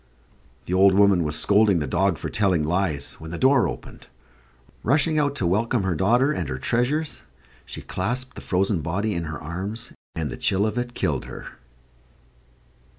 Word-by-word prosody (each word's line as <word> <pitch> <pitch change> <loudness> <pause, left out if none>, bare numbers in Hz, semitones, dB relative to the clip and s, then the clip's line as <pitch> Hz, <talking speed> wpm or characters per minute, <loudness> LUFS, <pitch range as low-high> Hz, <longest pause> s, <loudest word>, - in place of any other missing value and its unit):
The 90 - -4
old 95 +1 +5
woman 100 -3 +4
was 75 0 -2
scolding 100 +3 +5
the 75 - -1
dog - - +1
for - - -5
telling 95 -7 +1
lies, 80 -3 -1
when 80 0 -9
the 85 - -5
door 130 +2 +4
opened. - - -9 0.7
Rushing 155 +5 +2
out 145 -1 0
to 95 - -1
welcome 105 +5 +1
her 95 -1 0
daughter 120 - +2
and 85 - -3
her 65 - -3
treasures, 125 - -1 0.5
she - - -7
clasped 125 +7 -3
the - - -10
frozen 95 -1 0
body 100 +7 -2
in 85 -2 -3
her 75 -2 -6
arms; 95 +8 -4 0.2
and 80 -5 -3
the - - -6
chill 100 +1 +1
of 110 0 -2
it 120 0 -3
killed 80 -9 -1
her. - - -9
95 Hz, 175 wpm, -24 LUFS, 85-120 Hz, 0.7 s, old